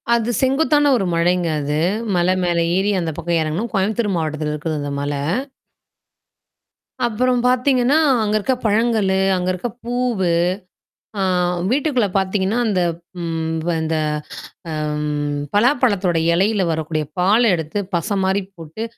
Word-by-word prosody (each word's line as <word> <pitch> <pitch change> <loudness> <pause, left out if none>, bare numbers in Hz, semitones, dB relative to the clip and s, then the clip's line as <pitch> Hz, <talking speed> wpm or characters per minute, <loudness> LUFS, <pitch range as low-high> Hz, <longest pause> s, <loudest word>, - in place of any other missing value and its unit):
அது 235 0 -1
செங்குத்தான 290 +2 +3
ஒரு 195 - -1
மலைங்க 175 +1 +1
அது. 145 +1 -1 0.4
மலை 175 +1 +3
மேல 175 -1 +1 0.2
ஏறி 200 +2 +1
அந்த 165 -1 -2
பக்கம் 170 0 0
இறங்கணும். 160 +9 -2
கோயம்புத்தூர் 205 +1 0
மாவட்டத்துல 155 -1 -2
இருக்குது 150 0 -3
அந்த 145 - -4
மல. 145 +1 -2 1.9
அப்புறம் 245 +2 +1
பார்த்தீங்கன்னா, 255 +2 +3 0.3
அங்க 215 0 0
இருக்க 260 +5 0
பழங்களு, 215 -3 +2 0.2
அங்க 180 0 -2
இருக்க 185 +7 -4 0.2
பூவு. 240 -6 0 0.9
ஆ - - 0 0.5
வீட்டுக்குள்ள 260 -5 +1
பாத்தீங்கன்னா, 190 +2 0
அந்த 195 -4 +1 0.4
ம் 160 0 -2
இந்த 160 0 -1 0.7
அ - - -4 0.8
பலாப்பழத்தோட 205 - +2 0.2
இலையில 195 +3 +2
வரக்கூடிய 155 -1 -2
பால் 210 +5 +4
எடுத்து 160 +3 -2 0.2
பச 200 +4 -1
மாரி 190 +1 +1
போட்டு 165 +5 -7
195 Hz, 125 wpm, -20 LUFS, 165-235 Hz, 1.9 s, பால்